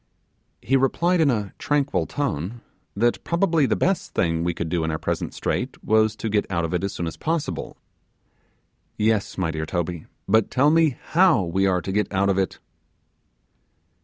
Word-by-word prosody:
He 135 - +2
replied 170 +7 +2
in 150 - +4
a 105 -6 -1
tranquil 145 -1 0
tone, 115 - -3 0.3
that 120 +4 +1
probably 170 -4 +2
the - - +1
best 190 -1 -1
thing 80 -1 +1
we 85 - +1
could 85 -1 -4
do 80 0 -1
in 80 - -1
our 80 - -1
present - - -3
strait - - -3
was 110 0 +3
to 115 - -4
get 105 -1 0
out 85 -3 0
of 80 - -4
it 90 - -1
as 100 - -1
soon 85 - -4
as 80 - -5
possible. 165 -1 -3 1.2
'Yes, 110 -1 0
my 90 -4 0
dear 80 0 -4
Toby, 85 -2 -3 0.2
but 110 +1 +3
tell 140 +3 +3
me 160 -4 +3
how 165 - +4
we 95 +3 +1
are 90 -3 +1
to 95 - -3
get 105 0 0
out 100 0 +1
of 95 0 +2
it. 95 - -1
105 Hz, 185 wpm, -23 LUFS, 90-140 Hz, 1.2 s, in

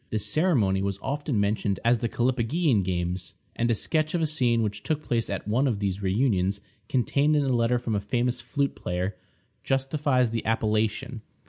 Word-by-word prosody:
The 110 - -1
ceremony 105 - +2
was 100 -1 -1
often 140 -4 -1
mentioned 100 -1 0
as 120 0 +4
the 115 - -1
Callipygian 125 - +1
games; 90 -1 -3 0.2
and 120 +1 0
a 115 - +3
sketch 155 - 0
of 170 - +1
a - - +4
scene 125 -7 +1
which 105 -1 -3
took 155 +4 -2
place 115 -3 -1
at 100 0 -4
one 125 +6 +2
of 115 -5 0
these 100 -1 -2
reunions, 100 -1 +1 0.3
contained 140 +4 +2
in 145 - +3
a 135 - 0
letter 120 +1 +2
from 120 -2 -3
a 105 - +1
famous 120 +3 -1
flute 140 +3 -1
player, 90 +3 -3 0.5
justifies 135 -2 +1
the 115 -1 -2
appellation. 110 +3 0
115 Hz, 185 wpm, -26 LUFS, 100-135 Hz, 0.5 s, as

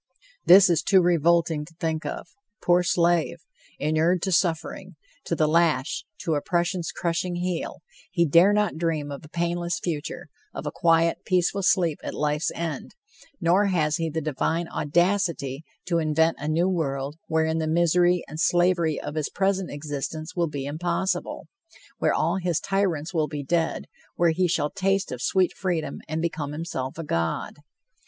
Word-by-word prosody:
This 195 +2 +9
is 170 -4 +2
too 190 - +4
revolting 170 -2 +2
to 165 +2 -15
think 160 -2 -2
of. - - -5 0.4
Poor 175 0 +4
slave! 170 -1 +2 0.4
Inured 160 +4 +1
to 190 - 0
suffering, 180 +1 -1 0.3
to 170 - -1
the 155 -1 +2
lash, 155 -4 +1 0.2
to 165 - -1
oppression's 175 +3 -1
crushing 175 +1 -2
heel, 175 -1 -3 0.3
he 170 -2 +2
dare 170 +6 +6
not 210 -5 +1
dream 160 -3 -1
of 140 - -7
a 150 - -13
painless 170 +1 -1
future, 155 -5 -4 0.3
of - - -6
a - - -2
quiet, 165 0 +2
peaceful 185 +1 +1
sleep 175 -4 +2
at - - -5
life's 150 +1 0
end, 160 -4 -5 0.4
nor 185 +4 +3
has 155 -5 +1
he 165 -1 -1
the 160 +1 -3
divine 160 +3 -1
audacity 170 -4 0 0.2
to 170 -2 +1
invent 160 +1 +2
a 150 - -4
new 165 +4 +2
world 145 -5 -2
wherein 160 0 +1
the 160 - -1
misery 175 +2 +3
and 155 - -8
slavery 175 -2 +2
of 145 - -6
his 155 -2 -2
present 195 -1 0
existence 145 +2 -5
will 170 -2 0
be 140 -2 -5
impossible, 170 +6 -2 0.5
where - - +2
all 170 +4 +1
his 175 -3 0
tyrants 190 -4 -1
will 155 -3 +1
be 150 -2 -5
dead, 165 +3 -1 0.3
where 170 -1 +3
he 180 +3 +1
shall 150 -3 0
taste 195 0 0
of 125 -1 -5
sweet 185 -2 +2
freedom 175 -5 -2
and 160 +1 -2
become 150 -3 -3
himself 150 -4 -4
a 165 - -4
god. 85 - -2
165 Hz, 165 wpm, -25 LUFS, 155-175 Hz, 0.5 s, This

